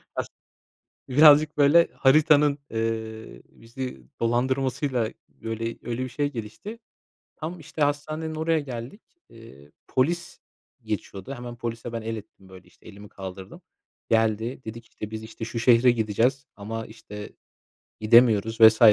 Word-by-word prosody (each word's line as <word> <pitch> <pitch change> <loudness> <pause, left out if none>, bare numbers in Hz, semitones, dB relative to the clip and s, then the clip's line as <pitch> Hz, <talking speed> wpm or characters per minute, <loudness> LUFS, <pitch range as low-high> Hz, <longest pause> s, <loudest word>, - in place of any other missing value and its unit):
Has - - -2 0.8
Birazcık 150 +2 +6
böyle 150 +4 +5
haritanın, 145 +1 +4
eee, 110 - -4
bizi 120 - -8 0.2
dolandırmasıyla, 130 0 0 0.2
böyle 115 0 -6 0.2
öyle 120 +2 -3
bir - - -5
şey 145 +2 -2
gelişti. 120 - -7 0.6
Tam 165 +2 -6
işte 155 0 -4
hastanenin 155 +2 -1
oraya 160 0 +1
geldik. 130 - -7 0.3
Eee, 75 -12 -15 0.2
polis 170 +6 -1 0.4
geçiyordu. 100 +8 -5
Hemen 120 -1 -8
polise 115 -1 -5
ben 115 -1 -4
el 115 0 -4
ettim, 95 -2 -13
böyle 95 -1 -14
işte, - - -24
elimi 100 0 -12
kaldırdım. 95 -1 -9 0.5
Geldi, 115 +3 +1
dedik; 115 +1 -8
işte, 105 - -8
biz 110 0 -6
işte 110 0 -7
şu 115 +1 -5
şehre 120 +1 +5
gideceğiz 120 +4 0
ama 110 +2 -5
işte 105 -2 -10 0.7
gidemiyoruz 110 0 +4
vs. 110 0 +8
115 Hz, 130 wpm, -25 LUFS, 110-140 Hz, 0.8 s, vs